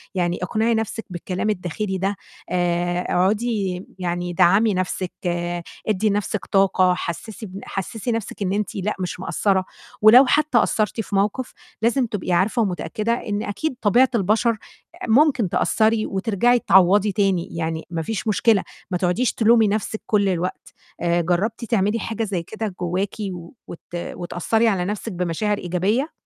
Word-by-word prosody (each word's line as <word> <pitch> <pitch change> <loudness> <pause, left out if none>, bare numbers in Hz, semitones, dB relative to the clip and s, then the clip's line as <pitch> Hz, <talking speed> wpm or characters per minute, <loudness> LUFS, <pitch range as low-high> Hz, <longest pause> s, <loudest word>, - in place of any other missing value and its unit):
يعني 175 -1 0
اقنعي 220 +5 +1
نَفْسِك 225 0 -2
بالكلام 180 +3 -3
الداخلي 190 +1 -2
ده، 195 +2 -1 0.3
آآ، 175 0 0
اقعدي 195 -1 0
يعني 175 0 -2
دعّمي 195 +5 +4
نَفْسِك، 185 0 -2 0.8
ادّي 215 0 +1
نَفْسِك 205 0 -2
طاقة، 190 -2 +3
حسّسي 215 +6 -5
بن 195 +1 -8
حسّسي 210 +5 -4
نَفْسِك 225 -2 -4
إن 190 0 0
أنتِ 210 0 -2
لأ 200 +2 -2
مش 180 0 -4
مقصّرة، 190 +2 0 0.4
ولو 235 +5 +8
حتّى 300 -2 +2
قصّرتي 215 +1 0
في 205 - -5
موقف 210 +6 0 0.3
لازم 240 +3 +2
تبقي 205 -5 -4
عارفة 195 +7 +2
ومتأكدة 215 +3 -1
إن 210 -3 -3
أكيد 265 +8 -3
طبيعة 240 +5 +4
البشر 220 +3 +2
أ 225 - -5 0.5
ممكن 245 - +4
تقصّري 220 +2 +2
وترجعي 225 +5 +2
تعوّضي 195 +2 +4
تاني، 195 -4 +1
يعني 160 -1 -2
ما 165 -1 -3
فيش 220 +6 -4
مشكلة، 215 -1 +3 0.3
ما 180 - +1
تقعديش 180 +8 +1
تلومي 225 -1 +4
نَفْسِك 215 +1 -2
كُلّ 200 -2 +2
الوقت. 180 0 -3 0.3
آآ، 170 0 +2
جرّبتِ 185 +8 -1
تعملي 215 -1 +1
حاجة 225 +1 -3
زي 190 -5 -2
كده 215 +1 -5
جواكِ 185 +3 -1 0.5
وت 170 - -8 0.2
وتأثّري 175 +6 -1
على 190 -5 +1
نَفْسِك 210 +3 -4
بمشاعر 180 +4 -1
إيجابية؟ 200 - 0
200 Hz, 150 wpm, -22 LUFS, 180-220 Hz, 0.8 s, ولو